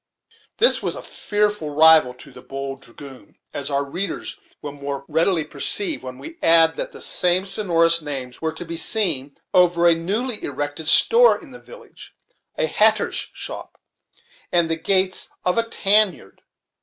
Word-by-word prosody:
This 480 Hz, +3 st, +3 dB
was -, -, -3 dB
a -, -, -8 dB
fearful 210 Hz, -6 st, -2 dB
rival 155 Hz, -3 st, +5 dB
to 140 Hz, +2 st, -15 dB
the -, -, -14 dB
"Bold 135 Hz, 0 st, -7 dB
Dragoon," 130 Hz, -2 st, -14 dB, 0.2 s
as 140 Hz, 0 st, -5 dB
our 140 Hz, 0 st, -1 dB
readers 175 Hz, +6 st, -3 dB, 0.2 s
will 145 Hz, -, -7 dB
the 140 Hz, 0 st, -16 dB
more 140 Hz, 0 st, -5 dB
readily 165 Hz, +2 st, +1 dB
perceive 150 Hz, +6 st, -3 dB
when 130 Hz, -1 st, -9 dB
we 330 Hz, +2 st, -12 dB
add 165 Hz, -1 st, +5 dB
that -, -, -5 dB
the -, -, -9 dB
same 180 Hz, +1 st, +2 dB
sonorous 170 Hz, -4 st, +1 dB
names 135 Hz, -4 st, -6 dB
were 160 Hz, 0 st, -2 dB
to 160 Hz, +3 st, -9 dB
be 165 Hz, 0 st, -5 dB
seen 155 Hz, -10 st, 0 dB, 0.2 s
over 175 Hz, -1 st, +3 dB
a 170 Hz, -, +6 dB
newly 210 Hz, +8 st, -2 dB
erected 145 Hz, +3 st, -5 dB
store 480 Hz, -, +5 dB
in 315 Hz, -7 st, -15 dB
the 245 Hz, -, -11 dB
village, -, -, -15 dB, 0.4 s
a -, -, +1 dB
hatter's -, -, +2 dB
shop, -, -, -7 dB, 0.7 s
and 170 Hz, -2 st, +2 dB
the -, -, +2 dB
gates 185 Hz, +2 st, +1 dB, 0.2 s
of 180 Hz, +5 st, +1 dB
a 230 Hz, 0 st, -2 dB
tan 210 Hz, -2 st, +3 dB
yard. 95 Hz, -, -19 dB
165 Hz, 170 wpm, -21 LUFS, 145-195 Hz, 0.7 s, a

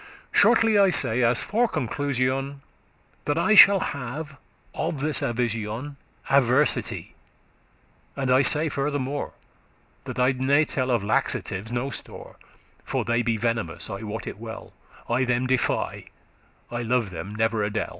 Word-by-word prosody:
Shortly 225 Hz, -1 st, +4 dB
I 195 Hz, -1 st, +5 dB
say, 125 Hz, -8 st, +1 dB
as 115 Hz, -2 st, +3 dB
for 235 Hz, +4 st, +1 dB
conclusion, 135 Hz, -, -2 dB, 0.6 s
That 145 Hz, +1 st, 0 dB
I 195 Hz, +6 st, +3 dB
shall 200 Hz, -1 st, +9 dB
have 140 Hz, +3 st, -6 dB, 0.4 s
of 150 Hz, -, -3 dB
this 150 Hz, -1 st, +1 dB
avision 115 Hz, +3 st, -3 dB, 0.3 s
Adversity; 135 Hz, +1 st, +1 dB, 1.0 s
and 135 Hz, -2 st, -1 dB
I 130 Hz, +1 st, +5 dB
say 150 Hz, +3 st, +2 dB
furthermore, 145 Hz, -1 st, -3 dB, 0.7 s
That -, -, -6 dB
I 125 Hz, +1 st, +3 dB
ne 140 Hz, +4 st, +3 dB
*tell 130 Hz, -3 st, -2 dB
of 120 Hz, -5 st, +1 dB
laxatives 105 Hz, 0 st, -1 dB
no 120 Hz, +3 st, -2 dB
store,* -, -, -8 dB
*hold -, -, -37 dB
laxatives -, -, -29 dB, 0.2 s
For -, -, -2 dB
they 120 Hz, 0 st, +1 dB
be 115 Hz, -1 st, 0 dB
venomous, 115 Hz, -5 st, -2 dB
I 100 Hz, -, -5 dB
wot 110 Hz, 0 st, -5 dB
it -, -, -7 dB
well; 110 Hz, -1 st, -9 dB, 0.3 s
of -, -, -22 dB
no -, -, 0 dB
value* -, -, +1 dB
I -, -, +2 dB
them 125 Hz, 0 st, 0 dB
defy,* 130 Hz, -1 st, -1 dB, 0.7 s
I 120 Hz, 0 st, -3 dB
love 120 Hz, -3 st, 0 dB
them 95 Hz, +5 st, -7 dB
never 110 Hz, 0 st, 0 dB
a 105 Hz, -, 0 dB
del. 110 Hz, +1 st, -3 dB
125 Hz, 160 wpm, -25 LUFS, 115-145 Hz, 1.0 s, shall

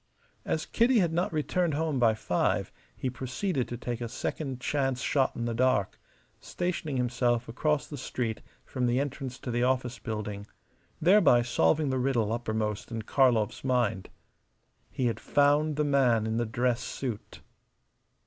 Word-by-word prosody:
As -, -, -1 dB
Kitty 240 Hz, +2 st, +3 dB
had 175 Hz, -6 st, +2 dB
not 175 Hz, +2 st, 0 dB
returned 160 Hz, +1 st, 0 dB
home 155 Hz, -3 st, 0 dB
by 115 Hz, -3 st, +4 dB
five -, -, 0 dB, 0.2 s
he -, -, -3 dB
proceeded 130 Hz, -, -2 dB
to 120 Hz, -, -5 dB
take 120 Hz, 0 st, -4 dB
a 120 Hz, -, -3 dB
second 130 Hz, +1 st, -4 dB
chance 135 Hz, -1 st, -1 dB
shot 135 Hz, 0 st, +1 dB
in 120 Hz, -, -3 dB
the 120 Hz, -, -1 dB
dark, 120 Hz, -5 st, +1 dB, 0.4 s
stationing 170 Hz, -5 st, -3 dB
himself 120 Hz, -1 st, 0 dB
across 150 Hz, +5 st, 0 dB
the 145 Hz, -, -8 dB
street 115 Hz, -4 st, -3 dB, 0.2 s
from 125 Hz, -2 st, -1 dB
the 120 Hz, +2 st, +2 dB
entrance 135 Hz, -2 st, -4 dB
to 125 Hz, -, -6 dB
the 120 Hz, +1 st, 0 dB
office 125 Hz, -1 st, 0 dB
building, 105 Hz, -2 st, -5 dB, 0.5 s
thereby 165 Hz, -, +5 dB
solving 120 Hz, -, +2 dB
the 130 Hz, -, 0 dB
riddle 120 Hz, -5 st, +1 dB
uppermost 110 Hz, -2 st, -2 dB
in 115 Hz, -2 st, -4 dB
Karlov's 120 Hz, -4 st, +2 dB
mind. 120 Hz, -7 st, 0 dB, 0.8 s
He 130 Hz, -, -2 dB
had 115 Hz, -, 0 dB
found 145 Hz, +1 st, +2 dB
the 150 Hz, -, +1 dB
man 130 Hz, -6 st, +3 dB
in 110 Hz, 0 st, -1 dB
the 120 Hz, -1 st, 0 dB
dress 120 Hz, +2 st, 0 dB
suit. 120 Hz, -6 st, -6 dB
125 Hz, 160 wpm, -28 LUFS, 115-145 Hz, 0.8 s, thereby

